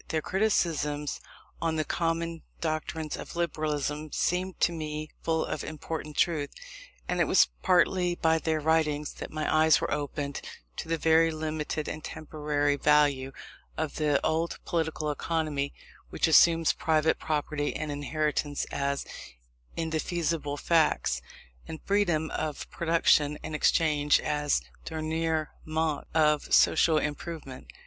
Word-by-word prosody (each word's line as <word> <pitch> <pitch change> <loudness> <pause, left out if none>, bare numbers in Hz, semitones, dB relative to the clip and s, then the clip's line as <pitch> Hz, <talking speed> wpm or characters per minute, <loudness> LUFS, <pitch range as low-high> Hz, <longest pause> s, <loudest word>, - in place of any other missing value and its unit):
Their 155 -1 -1
criticisms 155 -8 0 0.4
on 165 -1 0
the 155 -1 0
common 165 0 -1 0.2
doctrines 155 -1 -3
of - - -8
Liberalism 155 -2 -2
seemed 185 +1 -1
to - - +4
me 155 -2 -5
full 160 -1 0
of - - -4
important 155 0 -6
truth; 155 -4 +1 0.6
and - - -1
it - - +4
was - - +5
partly 180 -1 +3
by 160 -1 +2
their 160 -1 0
writings 150 -1 +1
that - - -5
my 155 0 -3
eyes 155 0 +5
were - - -1
opened 145 -1 -3 0.4
to - - -5
the 165 0 0
very 160 +1 +4
limited 155 -1 -3
and 155 - -5
temporary 150 -2 -1
value 145 -2 +3 0.5
of 160 -1 -3
the 150 -2 +2
old 165 +2 0
political 160 -2 -1
economy, 150 -2 -1 0.4
which - - +1
assumes 165 +1 +5
private 160 -1 +1
property 150 -1 -2
and 155 -1 -3
inheritance 145 0 -1
as 140 0 -1 0.7
indefeasible 160 -2 -1
facts, 155 - +2 0.5
and 160 - -6
freedom 175 -6 +1
of 155 -2 -3
production 160 -3 +3
and - - -5
exchange 150 -1 +3
as 150 -1 0
the - - -19 0.3
dernier 160 0 -1
mot 155 -1 -1
of 150 -2 +3
social 160 0 +5
improvement. 150 -2 -4
155 Hz, 130 wpm, -28 LUFS, 150-165 Hz, 0.7 s, was